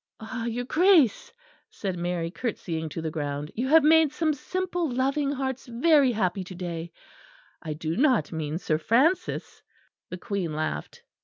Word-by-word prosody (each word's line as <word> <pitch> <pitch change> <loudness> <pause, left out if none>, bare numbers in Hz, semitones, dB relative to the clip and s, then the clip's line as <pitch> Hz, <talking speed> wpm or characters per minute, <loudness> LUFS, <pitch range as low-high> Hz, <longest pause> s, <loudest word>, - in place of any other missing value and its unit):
"Ah! 230 +1 -5
your 235 +1 -2
Grace," 315 - +4 0.4
said 190 -3 -4
Mary, 175 -1 -2
curtseying 170 -8 -4
to 160 +2 -6
the 160 - -2
ground, 145 -1 -4
"you 245 +4 -2
have 320 +2 +6
made 315 -1 +5
some 310 0 0
simple 355 +2 -2
loving 275 +3 0
hearts 265 -2 -3
very 270 +2 +4
happy 190 -4 -1
to 185 0 -10
day 170 -2 -5 0.7
I 155 - -4
do 160 +1 -3
not 250 - +2
mean 155 -1 -3
Sir 155 -3 -1
Francis'." 305 - +1 0.5
The 180 - -5
Queen 185 -4 -3
laughed. 155 - -4
225 Hz, 155 wpm, -26 LUFS, -, 0.7 s, have